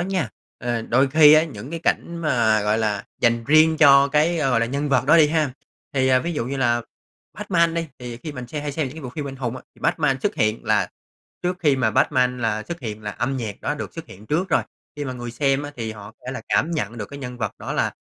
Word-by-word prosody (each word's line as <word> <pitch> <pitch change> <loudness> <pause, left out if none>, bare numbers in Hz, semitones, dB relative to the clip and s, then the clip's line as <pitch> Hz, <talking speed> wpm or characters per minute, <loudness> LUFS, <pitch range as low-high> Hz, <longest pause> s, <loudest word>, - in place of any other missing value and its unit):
nha, 185 -6 -1 0.3
ờ, 120 -1 -2
đôi 130 +4 +2
khi 150 +1 +7
á, 155 +1 +6
những 130 -3 -9
cái 170 - -4
cảnh 170 - 0
mà, 120 -10 +2
gọi 105 +1 +1
là, 105 -2 -1 0.2
dành 115 -1 +2
riêng 155 +3 +5
cho 140 -2 +7
cái, 155 +4 +2
gọi 130 -6 +2
là, 115 - +1
nhân 140 +4 -2
vật 135 - +2
đó 160 - +6
đi 155 -3 +6
ha. 155 -3 +1 0.4
Thì 130 -1 +2
ví 170 +4 -3
dụ 145 - -2
như 135 +1 -3
là 120 -2 +1 0.5
Batman 170 -3 +1
đi, 165 -1 -2
thì 120 -1 -7
khi 150 +5 -7
mình 125 -3 -7
xem 150 +3 -5
hay 145 -1 -3
xem 155 -2 -1
những 130 - -11
cái 160 - -8
bộ 125 - -5
phim 145 -1 -5
anh 135 - -7
hùng 125 -1 -3
á, - - -10
thì - - -22
Batman 135 -4 +1
xuất - - 0
hiện 110 +1 0
là - - +2 0.5
trước 180 0 -1
khi 145 -5 +3
mà 125 -4 +1
Batman 125 +2 +2
là 110 -2 -1
xuất 170 +6 -7
hiện 110 -4 -6
là 105 - -4
âm 135 +5 -2
nhạc 110 -5 -5
đó - - -1
được - - -6
xuất - - -7
hiện 105 +3 -14
trước 175 - 0
rồi. - - +2 0.3
Khi 145 - -3
mà 130 - -4
người 120 -1 -6
xem 135 +2 +1
á, 145 - -6
thì 115 -2 -4
họ 105 -1 -10
có - - -46
thể 130 - -3
là - - -5
cảm 160 - +2
nhận 120 - -3
được 105 - -4
cái 140 - -8
nhân 125 -2 -7
vật 110 -4 -2
đó - - -5
là - - 0
135 Hz, 270 wpm, -22 LUFS, 115-155 Hz, 0.5 s, khi